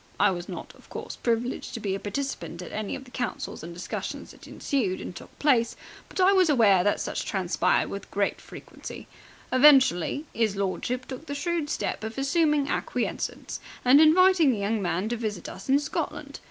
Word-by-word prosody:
I 200 0 +5
was 175 -1 -5
not, - - -7
of - - -20
course, - - -6
privileged 240 +2 -2
to - - -4
be 200 -3 -2
a 195 - -2
participant 205 -5 -4
at - - -9
the - - -6
many 215 -1 -3 0.2
councils 245 - -4
and 165 +2 -7
discussions 170 +1 -5
that - - -15
ensued 220 - -1
and 180 - -7
took - - -12
place, 250 -6 +2 0.3
but - - -7
I 375 +1 +6
was 375 -4 +4
aware 210 -10 +5
that 205 - +2
such - - -3
transpired 185 -3 +1
with 200 - -7
great 200 0 -1
frequency. - - -10 0.4
Eventually 265 - +5
'is 220 -3 +1
lordship 200 +6 -2
took 265 +4 -8
the 285 - -4
shrewd 325 0 -1
step 295 - -2
of 220 +2 -5
assuming 295 +1 +2
acquiescence - - -3 0.3
and 270 +4 +7
inviting 340 0 +6
the 230 - -1
young 205 +2 -1
man 180 +2 -1
to 240 - -1
visit 210 -6 -4
us 195 +7 -9
in 270 - +6
Scotland. 295 0 -4
235 Hz, 185 wpm, -27 LUFS, 200-285 Hz, 0.4 s, and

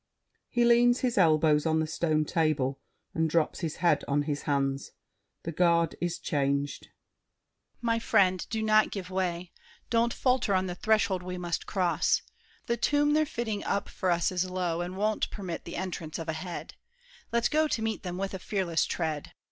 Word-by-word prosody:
[He 240 -1 +2
leans 240 +1 +5
his 250 -2 0
elbows 155 -3 +4
on 160 0 +2
the 160 - +1
stone 155 -1 0
table 145 -5 0 0.3
and 160 0 +1
drops 160 -1 +1
his 165 -4 -3
head 175 0 +2
on 145 +1 +1
his 145 -1 -2
hands. 135 -1 -1 0.5
The 165 - -3
Guard 170 -1 +2
is 175 -1 -1
changed. 140 -2 -1
DIDIER. - - -27 0.9
My 230 -1 +1
friend, 190 -5 +3
do 220 -1 -2
not 215 0 +4
give 185 -2 -6
way! 180 -2 -2 0.4
Don't 235 0 +3
falter 250 -6 +1
on 185 0 +1
this 180 -1 -5
threshold 210 -4 +2
we 180 0 -5
must 175 -1 -3
cross. 175 -4 +1 0.4
The 235 - 0
tomb 290 +4 +2
they're 310 0 +3
fitting 225 -7 -3
up 200 0 -1
for 185 - -2
us 170 0 +2
is 185 0 -1
low, 180 -2 -1
And 180 +2 -5
won't 215 +1 0
permit 185 -5 -6
the 170 - -7
entrance 170 -4 -4
of 165 - -6
a 160 - -1
head. 170 +2 -6 0.6
Let's 235 0 +2
go 310 +1 +2
to 230 - -1
meet 220 -1 -2
them 180 -1 -5
with 195 +1 -3
a 190 - -4
fearless 180 -4 0
tread. 155 -4 -3
180 Hz, 185 wpm, -29 LUFS, 160-215 Hz, 0.9 s, leans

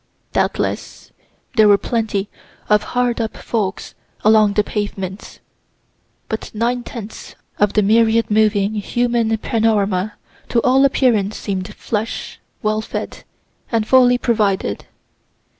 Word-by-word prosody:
Doubtless, - - -2 0.5
there 215 -1 +7
were 205 -1 +6
plenty 215 -3 -2 0.4
of 210 0 +5 0.2
hard 245 -1 +1
up 225 - -4
folks 205 -4 -3 0.3
along 215 -1 +5
the 210 - +2
pavements, 205 -2 -5 0.9
but 220 - -4
nine 240 +3 0
tenths 225 -3 -9 0.2
of 205 -1 +2
the 210 - +3
myriad 225 +2 +3
moving 210 -1 +2
human 230 +1 0
panorama 210 -3 0 0.4
to 235 - +2
all 265 +2 +4
appearance 225 -7 +2
seem'd 195 0 -4
flush, 220 +1 -4 0.2
well 215 0 +1
fed, - - -6 0.5
and 225 -2 0
fully 250 -1 +5
provided. 205 - 0
215 Hz, 115 wpm, -19 LUFS, 205-230 Hz, 0.9 s, there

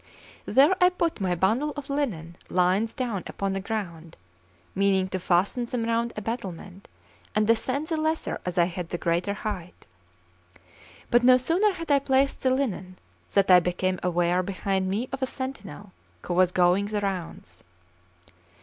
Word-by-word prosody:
There 275 - +5
I 360 - +7
put 340 - -2
my 180 -2 +1
bundle 230 - +1
of 285 -1 -6
linen 215 - -3
lines 185 +5 +2
down 235 -7 -3
upon 195 -1 -3
the 195 - -2
ground, 180 -6 -5 0.6
meaning 195 -1 +2
to 185 - -3
fasten 185 +7 +1
them 235 -1 -3
round 230 +1 0
a 215 - -4
battlement, 195 -4 -6 0.5
and 215 0 +3
descend 255 +6 +1
the 325 - 0
lesser 315 +1 -2
as 180 -1 -4
I 175 - +6
had 175 -1 -5
the 175 - -3
greater 175 +4 -1
height. 190 -5 -6 1.3
But 240 0 +4
no 255 0 +7
sooner 350 +11 +2
had 330 -4 -5
I 280 - +5
placed 270 0 +1
the 260 - +2
linen, 200 -9 -2 0.3
than 200 -1 +3
I 180 -1 +8
became 180 +1 -1
aware 175 0 +1
behind 190 0 -2
me 215 +6 -1
of 270 0 -5
a 260 - +1
sentinel, 210 -7 -7 0.3
who 175 - -3
was 180 0 +3
going 180 +3 +3
the 210 0 -2
rounds. 180 - -5
200 Hz, 165 wpm, -26 LUFS, 180-255 Hz, 1.3 s, I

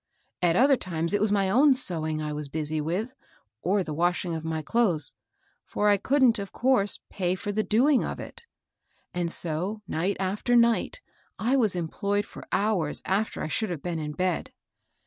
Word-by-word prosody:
At 170 -2 +3
other 270 +4 +5
times 170 -2 -2
it 205 - +2
was 215 -1 +2
my 200 -2 +2
own 265 +8 +5
sewing 160 - -1
I 150 0 -3
was 150 -1 -4
busy 155 +1 -2
with, 190 +11 -2 0.5
or 195 +3 +1
the 155 - -5
washing 175 +2 0
of 160 -1 -4
my 160 -1 -3
clothes, 185 - +2 0.3
— - - -40
for 210 - 0
I 205 - +5
couldn't, 260 -1 +3
of 200 -1 -6
course, 245 -6 +1
pay 185 -2 -1
for 205 +2 -4
the 215 +2 0
doing 250 +6 +3
of - - -4
it; 470 - -9 0.7
and 175 -1 -2
so 180 +7 -2
night 180 +5 -1
after 200 +6 0
night 235 - +2 0.4
I 245 +5 +1
was 220 -8 +3
employed 200 +4 -1
for - - -12
hours 200 -7 0
af 205 +3 +1
ter - - -5
I - - -2
should 215 +6 -1
have 165 -6 -5
been 175 -2 -3
in 150 -1 -4
bed. 180 +2 -1
190 Hz, 190 wpm, -26 LUFS, 165-220 Hz, 0.7 s, other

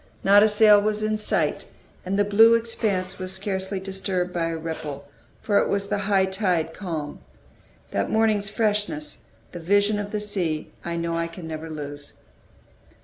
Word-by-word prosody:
Not 200 +1 +7
a 215 - +5
sail 210 -1 +6
was 215 0 -1
in 215 0 +1
sight, 215 - 0 0.4
and 190 +2 -2
the 205 - +4
blue 220 +3 +6
expanse 205 -5 -1
was 185 0 -5
scarcely 190 0 -2
disturbed 190 -2 -3
by 170 -1 0
a 165 0 -3
ripple, 155 -3 -6 0.4
for 205 -2 +3
it - - 0
was 200 0 -1
the 205 - 0
high 195 -2 +4
tide 185 -4 -1
calm. 160 -7 -5 0.7
That 100 - -1
morning's 215 -2 +2
freshness, 215 +8 -2 0.3
that 175 - -7
vision 205 +4 +2
of 205 0 -4
the 210 - -2
sea, 185 -7 -2
I 170 0 -3
know 170 0 -2
I 165 0 -1
can 165 0 -9
never 160 0 -6
lose. 145 -2 -8
195 Hz, 170 wpm, -24 LUFS, 170-210 Hz, 0.7 s, Not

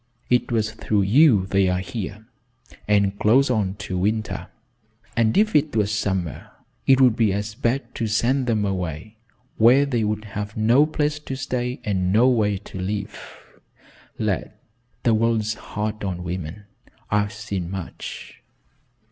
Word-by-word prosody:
It 125 0 +2
was 110 -2 0
through 105 -1 0
you 110 -1 +5
they 95 0 +2
are 90 - +1
here, 100 +3 -5 0.6
and 100 -1 +2
close 130 +5 +4
on 100 -5 0
to 90 -1 -3
winter, 110 +3 -1 0.7
and 115 +3 +2
if 215 -2 +3
it 150 -2 +2
was 105 -2 +1
summer, 95 -7 -2 0.4
it 135 -1 +6
would 125 -4 +5
be 110 -3 +2
as 105 +2 -3
bad 125 +3 -2
to 115 - -2
send 125 +5 +1
them 110 -3 +1
away 95 +2 -4 0.4
where 125 +5 +6
they 120 -5 0
would 105 0 -2
have 105 +1 -6
no 120 +7 +4
place 150 -1 -1
to 135 -3 -6
stay 125 -2 -3
and 95 -3 0
no 115 +5 +5
way 105 -5 +2
to 95 -1 -9
live. 100 +1 -5 0.7
Lad, - - -2 0.5
the 115 - +3
world's 110 -1 +1
hard 105 0 -5
on 90 -3 -3
women. 90 +2 -5 0.5
I've 105 0 +1
seen 100 -4 -5
much." 95 -2 -7
105 Hz, 150 wpm, -23 LUFS, 100-120 Hz, 0.7 s, it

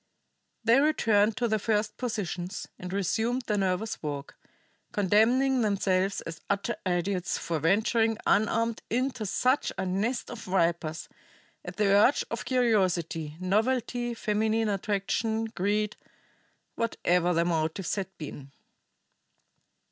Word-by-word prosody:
They 230 +4 +5
returned 220 -8 +3
to 245 - +1
their 220 -1 +1
first 215 0 0
positions, 195 -6 -4
and 180 0 -6
resumed 220 +6 0
their 210 -3 0
nervous 195 +3 -1
walk, 145 -2 -5 0.6
condemning 240 +7 +3
themselves 195 -2 +1
as 165 -1 -8
utter 200 +3 0
idiots 180 0 0
for 165 -2 -2
venturing 220 - +2
unarmed 230 +2 +2
into 250 -2 -1
such 255 +8 +1
a 190 - -1
nest 215 +9 -1
of 240 - -7
vipers 170 -3 0 0.6
at - - -7
the 210 - +2
urge 205 +7 +4
of 230 - -4
curiosity, 180 - +1
novelty, 240 +5 0
feminine 220 0 0
attraction, 210 +3 -1
greed 210 0 -1 0.8
whatever 180 -6 +1
their 170 0 +2
motives 165 +2 -1
had 195 -2 -2
been. 145 -3 -8
205 Hz, 120 wpm, -28 LUFS, 180-225 Hz, 0.8 s, They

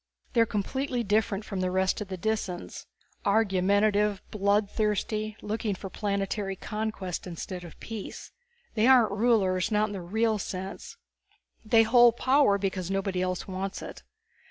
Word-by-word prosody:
They 235 - +4
are 230 - +4
completely 245 +5 -2
different 210 0 0
from 195 - -4
the 185 0 0
rest 190 +2 +1
of 210 - -4
the 185 -1 -5
Disans. 195 -3 -3 0.4
Argumentative, 205 0 +2
blood 205 0 +2
thirsty, 215 +1 -1
looking 210 -1 -2
for 190 0 -8
planetary 200 -1 -2
conquest 210 -4 -4
instead 180 +1 -6
of 170 - -12
peace. 225 -3 -7 0.4
They 220 +2 +3
aren't 250 -5 +6
rulers, 200 -4 +2
not 215 +1 +2
in - - -6
the 195 - -5
real 220 +4 0
sense. 190 +1 -6 0.7
They 225 +1 +5
hold 240 +1 +6
power 260 -6 +4
because 190 -2 -2
nobody 195 -1 -1
else 185 0 -2
wants 190 0 -4
it. - - -9
205 Hz, 150 wpm, -28 LUFS, 190-220 Hz, 0.7 s, aren't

